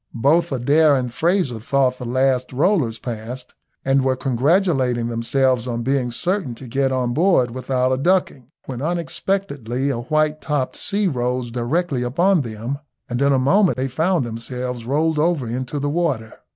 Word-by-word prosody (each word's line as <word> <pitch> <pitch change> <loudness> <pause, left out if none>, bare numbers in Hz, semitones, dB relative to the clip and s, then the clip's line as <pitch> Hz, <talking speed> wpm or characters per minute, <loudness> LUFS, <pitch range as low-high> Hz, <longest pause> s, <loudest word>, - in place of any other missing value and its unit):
Both 155 +8 +2
Adair 145 +4 +4
and 125 -3 -2
Frazer 165 - +1
thought 130 +2 +1
the 125 - -5
last 130 0 +1
rollers 135 - +1
passed, 120 +2 -7 0.3
and 135 0 +3
were 130 0 +2
congratulating 130 -2 +1
themselves 125 +1 +1
on 120 -1 -2
being 130 -1 0
certain 170 - -2
to 130 - -11
get 135 +2 0
on 125 -2 0
board 155 -6 +3
without 130 0 -1
a 130 - 0
ducking, 150 -6 0 0.2
when 125 -2 -6
unexpectedly 165 - -2
a 120 - -3
white 155 +4 0
topped 145 -4 -1
sea 205 0 0
rose 125 -4 -2
directly 130 +4 -1
upon 170 +9 +2
them, 115 +3 -5 0.3
and 120 +2 -1
in 140 0 +4
a 135 - +4
moment 180 +8 +3
they 130 +1 -1
found 160 +3 0
themselves 120 +1 -5
rolled 155 +3 +1
over 160 -4 +1
into 125 +4 -4
the 145 0 -1
water. 145 -8 -1
130 Hz, 165 wpm, -21 LUFS, 125-155 Hz, 0.3 s, Adair